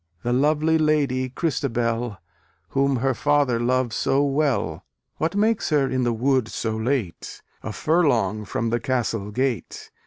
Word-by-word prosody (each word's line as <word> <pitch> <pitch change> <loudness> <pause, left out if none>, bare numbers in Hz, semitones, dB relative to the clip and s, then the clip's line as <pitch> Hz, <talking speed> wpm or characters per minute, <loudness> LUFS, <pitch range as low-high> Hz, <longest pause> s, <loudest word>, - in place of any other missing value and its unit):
The 120 - 0
lovely 155 +4 +2
lady, 140 -4 +1
Christabel, 120 - -1 0.5
Whom 140 0 +1
her 130 +2 +1
father 145 -2 +2
loves 125 -1 0
so 135 +1 +2
well, 135 - 0 0.3
What 165 +4 -1
makes 215 +2 +1
her 145 -4 +2
in 130 0 -1
the 120 -1 +1
wood 125 +1 +1
so 110 -1 -3
late, 110 - -3 0.2
A 110 - -5
furlong 115 - +1
from 115 +4 -2
the 120 - +1
castle 115 -5 -1
gate? 125 - -3
130 Hz, 145 wpm, -23 LUFS, 115-145 Hz, 0.5 s, lovely